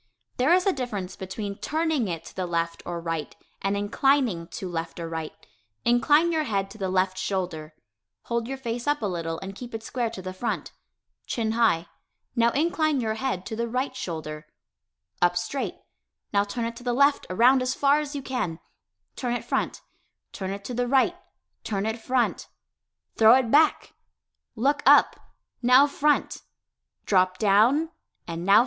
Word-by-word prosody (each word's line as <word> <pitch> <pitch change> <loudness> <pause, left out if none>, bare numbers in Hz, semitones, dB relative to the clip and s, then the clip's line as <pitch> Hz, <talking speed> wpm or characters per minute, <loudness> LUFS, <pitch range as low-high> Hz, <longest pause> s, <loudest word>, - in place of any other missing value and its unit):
There 260 +6 +3
is 365 +1 +4
a 390 - +3
difference 205 - -4
between 200 +1 -6
turning 315 -6 0
it 165 -2 -4
to - - -12
the 185 -1 -2
left 170 -1 -2
or 175 -1 -3
right 165 -2 -4 0.3
and 195 +1 0
inclining 215 -3 +1
to 190 - -6
left 170 -1 -5
or 165 - -4
right. 160 -1 -5 0.5
Incline 295 +8 +4
your 315 -2 0
head 195 -4 -1
to 220 - -12
the 190 -1 -1
left 185 0 +1
shoulder 175 -5 -3 0.5
hold 235 -1 -2
your 270 +1 -4
face 240 0 -4
up 290 -4 +1
a - - +1
little 165 -4 -3
and 195 0 -6
keep 240 +3 -8
it 220 - -6
square 240 0 -2
to 195 - -8
the 185 0 -5
front 210 +6 -3 0.6
chin 225 -2 -1
high 220 -8 +2 0.5
now 235 -1 +4
incline 310 -1 +1
your 220 -3 -1
head 220 -5 -3
to 220 - -5
the 235 +1 -2
right 255 +3 -2
shoulder 155 -8 -6 0.7
up 175 0 +3
straight 175 +11 -3 0.6
now 200 0 +4
turn 230 +3 -3
it 230 0 -4
to 245 - -11
the 245 -1 0
left 280 +3 +3
(around 245 +8 +5
as 255 +1 -1
far 285 +1 +4
as 295 -1 -5
you 280 - -4
can) 225 -12 -2 0.6
turn 245 -2 -2
it - - -5
front - - -1 0.5
turn 190 -1 -5
it 200 +1 -5
to 245 - -5
the 245 +1 0
"right" 265 +1 +3 0.5
turn 200 -1 -2
it 220 +1 -2
"front" 250 0 0 0.7
throw 225 +2 +8
it 255 -3 +1
"back" 305 +2 +3 0.6
look 280 +6 +1
up, - - +6 0.4
now 250 +3 +7
"front" 290 +1 +1 0.6
drop 185 -2 +3
"down" 230 +11 +3 0.4
and 170 0 -4
now 195 +2 +4
"front." - - +9
225 Hz, 180 wpm, -26 LUFS, 185-260 Hz, 0.7 s, front